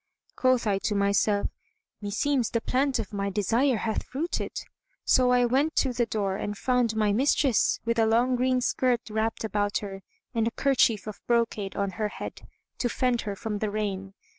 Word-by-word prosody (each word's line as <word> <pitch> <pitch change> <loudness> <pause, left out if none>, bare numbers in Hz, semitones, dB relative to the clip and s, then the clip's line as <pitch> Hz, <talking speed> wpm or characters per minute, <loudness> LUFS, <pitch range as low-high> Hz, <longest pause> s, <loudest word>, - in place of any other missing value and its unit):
Quoth 255 -2 +2
I 200 -2 +1
to 210 - 0
myself, 200 +1 +2 0.6
"Meseems 225 +4 0
the 230 - 0
plant 265 +4 0
of 205 - -5
my 200 0 -1
desire 225 +6 +1
hath 220 0 -1
fruited." 315 +7 -3 0.6
So 255 -1 +4
I 245 0 +4
went 275 +6 +1
to 260 -2 +2
the 240 -1 0
door 200 -3 -1
and 205 0 -4
found 250 -2 +1
my 210 -2 +2
mistress, 265 +1 +2
with 230 0 0
a 225 - +4
long 240 +3 +3
green 255 0 +1
skirt[FN#170] 245 -3 0
wrapped 220 +1 -1
about 205 -1 0
her 195 -2 -6 0.3
and 225 -1 +1
a - - 0
kerchief 245 -7 +2
of 215 -1 -8
brocade 230 -4 0
on 200 -1 -1
her 215 +2 -2
head, - - -7 0.4
to 245 - 0
fend 250 0 0
her 200 - -3
from 210 0 -4
the 215 - -1
rain. 195 -2 -3
225 Hz, 185 wpm, -27 LUFS, 205-250 Hz, 0.6 s, So